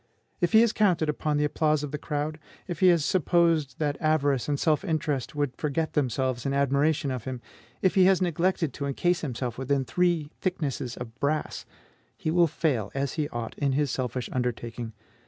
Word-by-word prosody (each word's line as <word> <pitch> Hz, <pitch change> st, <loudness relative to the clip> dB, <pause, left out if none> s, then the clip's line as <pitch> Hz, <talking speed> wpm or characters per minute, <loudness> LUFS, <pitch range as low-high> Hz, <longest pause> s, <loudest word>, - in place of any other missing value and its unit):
If 175 Hz, -1 st, 0 dB
he 220 Hz, -, +8 dB
has 230 Hz, -2 st, +3 dB
counted 180 Hz, -7 st, +2 dB
upon 150 Hz, 0 st, 0 dB
the 150 Hz, -, +2 dB
applause 150 Hz, 0 st, +1 dB
of 145 Hz, -, -4 dB
the 150 Hz, -, -4 dB
crowd; 150 Hz, +1 st, -3 dB, 0.3 s
if 175 Hz, -, -5 dB
he 185 Hz, -, +5 dB
has 170 Hz, -4 st, +4 dB
supposed 165 Hz, -6 st, +2 dB
that 145 Hz, -2 st, -1 dB
avarice 145 Hz, -4 st, +1 dB
and 145 Hz, -1 st, 0 dB
self 155 Hz, +1 st, +2 dB
interest 150 Hz, -7 st, -2 dB
would 145 Hz, -4 st, -1 dB
forget 155 Hz, +1 st, -2 dB
themselves 130 Hz, -3 st, 0 dB
in 140 Hz, 0 st, -1 dB
admiration 140 Hz, +1 st, +2 dB
of 125 Hz, -3 st, -4 dB
him; 130 Hz, -2 st, -4 dB, 0.4 s
if 190 Hz, -, +4 dB
he 190 Hz, -2 st, +5 dB
has 190 Hz, -1 st, +5 dB
neglected 175 Hz, -3 st, 0 dB
to 140 Hz, +1 st, -4 dB
encase 175 Hz, +5 st, +1 dB
himself 125 Hz, -4 st, -4 dB
within 135 Hz, 0 st, 0 dB
three 165 Hz, +3 st, +1 dB
thicknesses 145 Hz, -9 st, -2 dB
of 120 Hz, -2 st, -7 dB
brass, 150 Hz, +2 st, -2 dB, 0.5 s
he 155 Hz, -, -2 dB
will 170 Hz, 0 st, +4 dB
fail, 140 Hz, -9 st, -1 dB
as 135 Hz, -1 st, -1 dB
he 150 Hz, -2 st, -2 dB
ought, 120 Hz, -1 st, -5 dB
in 140 Hz, -2 st, +1 dB
his 145 Hz, -1 st, +1 dB
selfish 125 Hz, -1 st, -2 dB
undertaking. 120 Hz, -2 st, -3 dB
145 Hz, 190 wpm, -27 LUFS, 130-165 Hz, 0.5 s, he